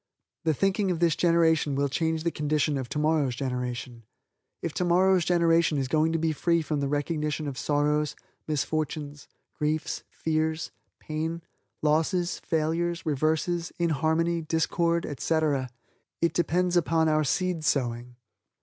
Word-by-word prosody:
The 160 -2 +2
thinking 195 - +1
of 175 -3 -1
this 170 -2 +3
generation 165 -4 +3
will 140 +1 +1
change 160 +3 -1
the 170 - 0
condition 150 0 0
of 130 -3 -4
tomorrow's 150 -4 +1
generation. 125 -2 -4 0.6
If 165 - -2
tomorrow's 180 +1 +3
generation 170 -3 +3
is 135 -2 -1
going 155 +3 +2
to - - +2
be 160 0 +1
free 170 +2 +1
from 150 -1 -2
the 140 - 0
recognition 150 +1 -1
of 140 - -4
sorrows, 150 +1 0 0.3
misfortunes, 150 0 -3 0.3
griefs, 155 +1 -2
fears, 160 0 -1 0.3
pain, 160 +2 -4 0.4
losses, 165 +4 +1
failures, 165 +2 -1
reverses, 160 +3 0
inharmony, 165 +1 +1
discord, 170 +1 0
etc., 145 -3 0 0.5
it 170 - +1
depends 175 +1 +1
upon 165 -1 +3
our 155 0 +3
seed 180 +2 0
sowing. 125 -4 -1
155 Hz, 130 wpm, -27 LUFS, 150-170 Hz, 0.6 s, this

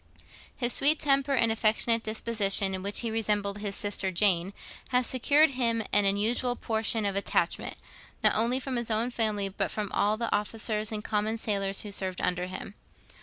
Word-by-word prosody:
His 240 -1 +3
sweet 300 +3 +5
temper 275 -1 +1
and 230 -3 +2
affectionate 225 +1 +2
disposition, 210 -3 +1
in 190 - -4
which 200 +2 -2
he 230 -2 -3
resembled 210 -2 -1
his 205 -1 -4
sister 205 -2 0
Jane, 185 -1 +2 0.4
had 250 -1 +1
secured 285 +6 +3
to - - -10
him 230 -3 0
an 205 -1 +4
unusual 220 +5 +1
portion 220 -1 -2
of 200 -1 -1
attachment, 200 - -1 0.5
not - - +5
only 235 +4 +2
from 260 -1 -4
his 235 -1 -2
own 225 +3 0
family, 215 -4 0
but 195 - -3
from 210 -2 -4
all 210 +1 +1
the 230 -1 -1
officers 215 +1 -2
and 210 -1 -5
common 215 +1 -1
sailors 195 -3 -2
who 210 - -8
served 190 -2 -3
under 180 0 -1
him. 185 +2 -8
215 Hz, 180 wpm, -28 LUFS, 200-235 Hz, 0.5 s, sweet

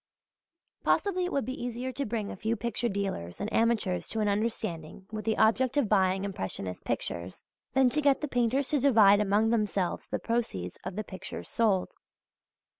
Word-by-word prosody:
Possibly 370 -3 +2
it 360 - -3
would 275 - 0
be 255 -1 -5
easier 245 +1 -3
to 280 0 -3
bring 215 -2 -2
a - - -6
few 220 +4 -1
picture 235 +2 -1
dealers 195 - -3
and 215 - -3
amateurs 225 -5 +1
to 225 - -3
an 210 - +1
understanding 200 -5 -2
with 215 -1 -5
the 220 -1 +1
object 255 +5 +3
of 280 -6 +3
buying 190 -2 +2
impressionist 95 - -4
pictures, 85 +1 -3 0.3
than 265 -2 +5
to 300 - +1
get 280 -2 +4
the 300 - -2
painters 250 +2 +1
to 295 - +2
divide 215 -7 +6
among 210 +2 +2
themselves 205 -5 0
the - - -2
proceeds 220 - -2
of 180 - -5
the 215 - -2
pictures 190 -2 -8
sold. 210 -6 +1
220 Hz, 180 wpm, -29 LUFS, 195-245 Hz, 0.3 s, divide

